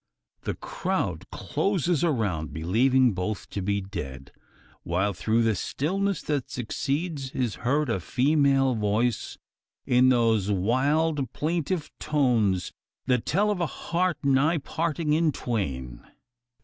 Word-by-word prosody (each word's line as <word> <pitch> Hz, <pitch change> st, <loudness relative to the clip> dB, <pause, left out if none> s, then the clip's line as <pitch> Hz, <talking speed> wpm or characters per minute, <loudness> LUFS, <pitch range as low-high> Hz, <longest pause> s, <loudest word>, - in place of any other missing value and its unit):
The -, -, -2 dB
crowd -, -, -3 dB
closes 175 Hz, -5 st, 0 dB
around, 105 Hz, -, 0 dB
believing 120 Hz, +9 st, +3 dB
both 95 Hz, +3 st, -3 dB
to 100 Hz, -, -3 dB
be 100 Hz, +1 st, 0 dB
dead; 70 Hz, -9 st, -7 dB, 0.5 s
while 95 Hz, +4 st, 0 dB
through 110 Hz, +6 st, +1 dB
the 115 Hz, -1 st, +3 dB
stillness 190 Hz, -, -1 dB
that 145 Hz, -4 st, -2 dB
succeeds 140 Hz, +4 st, -2 dB
is 125 Hz, -5 st, -1 dB
heard 145 Hz, +4 st, +1 dB
a 115 Hz, -5 st, 0 dB
female 135 Hz, -, +2 dB
voice, 110 Hz, +1 st, 0 dB, 0.5 s
in 125 Hz, +1 st, +5 dB
those 115 Hz, -5 st, +3 dB
wild 135 Hz, -, +1 dB
plaintive 165 Hz, +1 st, -2 dB
tones 115 Hz, -, +1 dB, 0.3 s
that 125 Hz, -3 st, +1 dB
tell 205 Hz, +5 st, +2 dB
of 190 Hz, -4 st, -2 dB
a 170 Hz, -, +1 dB
heart 175 Hz, +2 st, -1 dB
nigh 140 Hz, +5 st, +3 dB
parting 155 Hz, +1 st, -1 dB
in 160 Hz, 0 st, +3 dB
twain! 65 Hz, -, -3 dB
130 Hz, 125 wpm, -26 LUFS, 105-155 Hz, 0.5 s, in